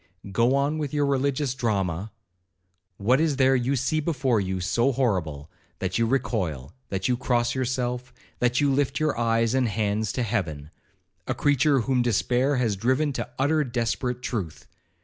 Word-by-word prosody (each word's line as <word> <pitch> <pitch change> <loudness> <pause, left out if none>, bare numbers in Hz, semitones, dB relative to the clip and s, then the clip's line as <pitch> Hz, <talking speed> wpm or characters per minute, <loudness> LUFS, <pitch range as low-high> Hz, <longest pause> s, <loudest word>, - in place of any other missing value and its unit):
Go 120 +6 +3
on 145 +3 +1
with 150 -1 -3
your 145 -1 +2
religious 140 -1 0
drama. 100 -6 -1 0.9
What 125 +8 +3
is 160 -3 +1
there 135 0 +4
you 130 +2 +1
see 135 +5 0
before 135 -8 +1
you 95 -1 -2
so 115 +9 +1
horrible, 90 - -1 0.3
that 95 +3 -2
you 115 - +2
recoil, 90 - -1 0.2
that 95 -1 -1
you 125 - +2
cross 120 -1 0
yourself, 125 -1 -2 0.3
that 125 0 +2
you 145 -1 +3
lift 135 0 0
your 155 -1 +1
eyes 115 0 +1
and 130 -2 +2
hands 110 0 -1
to 125 - -1
heaven?—a 90 -1 -5
creature 145 -1 +3
whom 130 +1 +1
despair 125 +4 +1
has 120 -5 +1
driven 130 +8 +1
to 125 - -4
utter 150 +3 +2
desperate 125 0 -2
truth! 95 -12 -4
125 Hz, 160 wpm, -25 LUFS, 105-135 Hz, 0.9 s, there